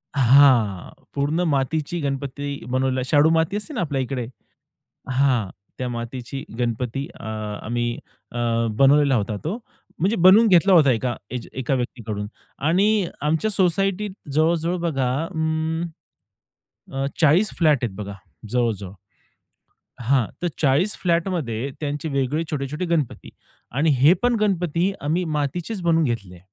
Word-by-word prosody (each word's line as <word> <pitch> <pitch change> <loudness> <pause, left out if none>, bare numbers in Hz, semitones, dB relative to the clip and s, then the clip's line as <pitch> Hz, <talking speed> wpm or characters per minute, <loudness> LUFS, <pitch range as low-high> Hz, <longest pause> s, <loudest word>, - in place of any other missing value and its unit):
हां. 125 -7 +5 0.2
पूर्ण 145 +5 0
मातीची 150 +5 -1
गणपती 140 0 -3
बनवलेला 130 0 0
शाडू 145 +3 +4
माती 165 +5 +1
असते 210 +9 -7
ना 245 - -2
आपल्या 145 -5 -1
इकडे. 130 -1 -3 0.9
हां, 125 -6 +2 0.3
त्या 125 - -3
मातीची 120 +3 -5 0.2
गणपती 125 +3 -2
अ, - - -11 0.4
आम्ही 120 +1 -1 0.4
अ, 120 - -6 0.4
बनवलेला 140 +1 +5
होता 105 -1 -1
तो. 180 +8 -2 0.4
म्हणजे 195 +7 +2
बनवून 190 +6 +7
घेतला 185 0 +5
होता 150 -6 +6
एका, 120 0 -1 0.2
एज 125 -2 -5
एका 130 +1 -2
व्यक्तीकडून 110 -5 -4 0.4
आणि 200 +3 +3
आमच्या 160 +8 +1
सोसायटीत 195 +1 +1 0.2
जवळ-जवळ 165 +3 +2
बघा 135 -7 0 0.2
उम्म, 160 0 -1 1.1
अ, 135 0 -1 0.2
40 170 +7 +5
फ्लॅट 155 -7 +3
आहेत 110 -5 -2
बघा 100 -1 -6 0.4
जवळ-जवळ. 110 -6 -1 1.1
हां, 130 0 +3 0.2
तर 175 - 0
40 150 +9 +2
फ्लॅट 170 0 +1
मध्ये 135 -8 -2
त्यांचे 145 +1 -3
वेगळे 140 +3 0
छोटे-छोटे 150 +4 -3
गणपती. 165 -7 -2 0.4
आणि 145 +6 +1
हे 150 +6 +7
पण 245 -1 +3
गणपती 180 -2 +1
आम्ही 165 +5 0
मातीचेच 175 +8 -3
बनवून 165 -1 +3
घेतले. 100 - -3
145 Hz, 130 wpm, -23 LUFS, 125-170 Hz, 1.1 s, बनवून